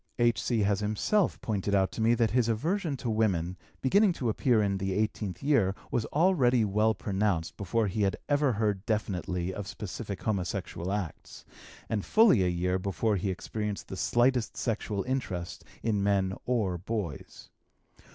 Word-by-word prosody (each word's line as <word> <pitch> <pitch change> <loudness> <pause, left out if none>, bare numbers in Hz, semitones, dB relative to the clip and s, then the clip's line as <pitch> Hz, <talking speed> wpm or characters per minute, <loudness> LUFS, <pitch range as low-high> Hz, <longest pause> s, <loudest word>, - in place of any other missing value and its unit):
H.C. 120 -1 +2
has 100 -1 +2
himself 110 - +1
pointed 100 -2 -1
out 95 -1 +2
to - - -5
me 115 +2 +4
that 115 -1 +2
his 120 -2 +2
aversion 155 - -1
to 125 - -5
women, 95 -6 +1 0.3
beginning 195 +8 +4
to 125 -8 -2
appear 120 +1 +2
in 100 -2 +1
the 95 0 -1
eighteenth 105 -2 -2
year, 120 -10 +3 0.2
was 115 - 0
already 135 - +3
well 105 +2 +2
pronounced 95 -3 -1
before 105 +3 0
he 105 +2 -2
had 100 -1 +1
ever 145 -3 +2
heard 105 -3 0
definitely 95 -4 -1
of 100 0 -6
specific 100 0 -6
homosexual 95 -3 -2
acts, 100 -5 -5 0.4
and 105 -3 -1
fully 215 - +5
a - - +2
year 90 +1 0
before 100 +3 0
he 95 +1 -1
experienced 105 +2 -4
the - - -5
slightest 120 +4 +1
sexual 105 -4 -2
interest 105 -10 -3 0.2
in 105 -3 +1
men 100 -1 +1
or 105 -8 0
boys. 95 -6 -5
105 Hz, 160 wpm, -29 LUFS, 95-120 Hz, 0.4 s, fully